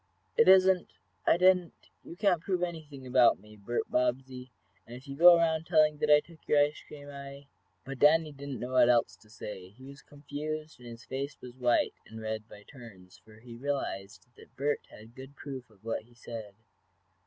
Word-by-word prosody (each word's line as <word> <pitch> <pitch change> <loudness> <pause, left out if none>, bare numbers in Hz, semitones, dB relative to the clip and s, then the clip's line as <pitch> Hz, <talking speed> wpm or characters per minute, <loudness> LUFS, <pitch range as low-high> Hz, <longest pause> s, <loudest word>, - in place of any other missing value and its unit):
"It 230 - +4
isn't 190 -1 +5 0.3
I - - +5
didn't 180 -1 +3 0.3
you - - -10
can't 185 -4 +2
prove 180 0 -1
anything 155 -6 -6
about 125 -1 +4
me, 105 +2 -16
Bert 105 +4 -3
Bobbsey, 125 +1 -2 0.4
and 120 - -9
if 130 +3 -13
you 140 - -6
go 175 +3 +8
around 160 -1 0
telling 155 -3 +3
that 150 - 0
I 150 0 +7
took 165 0 -18
your 150 - +3
ice 145 +1 +2
cream, 145 -1 -11
I 140 0 -10 0.2
" - - -44
But 135 -1 -7
Danny 155 +2 +4
did 140 0 -9
not 130 -5 -5
know 125 +1 -5
what 130 -1 +5
else 120 -1 +2
to 105 - -23
say. 100 -4 -9
He 115 +7 -18
was 140 +1 -12
confused 150 +1 -7
and 120 -1 -11
his 115 0 -11
face 140 +2 -5
was 125 -1 -11
white 125 -2 +1
and 110 0 -10
red 110 0 -5
by 105 - -13
turns, 105 -9 -15
for 110 0 -19
he 120 0 -12
realized 120 -7 -4
that - - -18
Bert 145 +2 -2
had 110 +2 -15
good 130 +2 -12
proof 135 -4 -8
of 110 0 -25
what 115 - -2
he 120 +2 -23
said. 115 -4 -9
135 Hz, 205 wpm, -30 LUFS, 120-150 Hz, 0.4 s, go